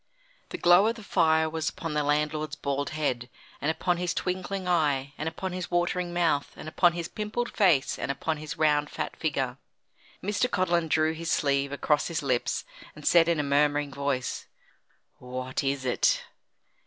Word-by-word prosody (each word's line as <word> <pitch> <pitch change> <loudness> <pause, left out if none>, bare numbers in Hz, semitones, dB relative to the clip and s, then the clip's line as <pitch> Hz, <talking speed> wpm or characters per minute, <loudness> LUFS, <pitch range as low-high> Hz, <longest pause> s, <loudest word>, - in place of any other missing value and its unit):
The - - -5
glow 175 +4 +6
of 230 - 0
the 225 - -11
fire 160 -4 +3
was 160 0 -2
upon 165 -1 -5
the 150 0 +1
landlord's 150 +1 0
bald 140 0 -2
head, 130 -5 -2 0.3
and 145 - 0
upon 175 +2 0
his 175 0 -1
twinkling 185 +1 -3
eye, 145 -6 +1
and 160 - -2
upon 185 +3 -5
his 180 -2 -4
watering 175 0 0
mouth, 170 -5 +1
and - - -9
upon 170 +2 +3
his 170 -1 -4
pimpled 220 +4 -3
face, 175 - +3
and - - -3
upon 155 +3 -1
his 150 0 -7
round 150 -1 +2
fat - - -4
figure. 135 -4 -2 0.6
Mr. 210 +6 +1
Codlin 175 -5 +1
drew 155 0 +2
his 165 +1 -5
sleeve 140 -1 +1
across 145 +1 +1
his 165 -3 -3
lips, 125 -3 0 0.3
and 150 - -11
said 170 -1 +5
in 170 -2 +2
a - - +1
murmuring 145 0 +2
voice: 140 -2 -2 0.7
"What 130 +1 -4
is 135 -1 -1
it?" 125 - +2
155 Hz, 175 wpm, -27 LUFS, 140-175 Hz, 0.7 s, glow